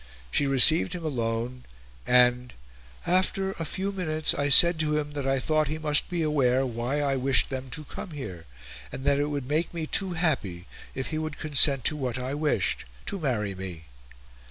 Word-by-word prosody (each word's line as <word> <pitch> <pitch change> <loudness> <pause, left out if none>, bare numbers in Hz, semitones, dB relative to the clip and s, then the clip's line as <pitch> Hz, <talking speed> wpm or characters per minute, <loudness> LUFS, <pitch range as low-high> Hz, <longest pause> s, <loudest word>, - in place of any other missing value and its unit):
She 140 - +1
received 155 +6 +6
him 175 -2 -6
alone, 120 -2 -3 0.4
and 125 0 +3 0.5
"after 190 +2 0
a 165 -4 -6
few 190 +5 -3
minutes 155 -5 +1
I 145 0 -1
said 170 +4 +7
to 150 -1 0
him 150 -1 -3
that 145 -2 -4
I 135 0 +1
thought 155 +3 0
he 155 +3 -3
must 150 -1 +1
be 175 -2 -2
aware 135 -4 +1
why 125 +4 -3
I 140 -1 0
wished 135 +2 +2
them 130 0 -5
to 155 +3 -6
come 185 - -9
here 100 - -8 0.4
and 135 - -8
that 140 0 +2
it 145 - 0
would 140 -3 -4
make 155 +4 -1
me 165 -2 -3
too 185 +3 -1
happy 130 - -2 0.3
if 130 - -4
he 155 - -3
would 155 -2 -5
consent 140 -3 +3
to - - +2
what 130 -5 -4
I 130 +1 -4
wished 150 - -1 0.2
(to 200 - -5
marry 110 - -2
me.)" 90 -4 -8
145 Hz, 190 wpm, -26 LUFS, 125-155 Hz, 0.5 s, said